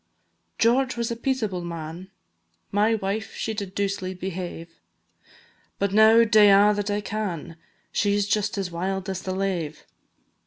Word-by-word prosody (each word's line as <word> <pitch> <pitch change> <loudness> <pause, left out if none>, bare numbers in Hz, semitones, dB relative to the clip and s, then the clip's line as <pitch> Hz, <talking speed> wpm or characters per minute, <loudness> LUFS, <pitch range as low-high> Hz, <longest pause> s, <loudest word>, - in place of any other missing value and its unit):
George 255 +2 +2
was 235 0 -2
a - - -1
peaceable 225 -8 -2
man, 170 +2 -7 0.6
My 210 +3 +3
wife 205 +1 -3
she 220 - -3
did 200 -3 -6
doucely 195 -2 -2
behave; 175 -2 -6 1.0
But 200 -1 -1
now 220 +2 +7
dae 215 -2 +6
a' 200 +1 +6
that 205 0 -2
I 205 0 0
can, 190 -7 -4 0.4
She 205 -1 +1
's 205 - +1
just 205 0 0
as 190 -3 -3
wild 190 +3 -3
as 190 -1 -4
the 185 0 -4
lave. 180 -6 -3
200 Hz, 150 wpm, -25 LUFS, 185-215 Hz, 1.0 s, now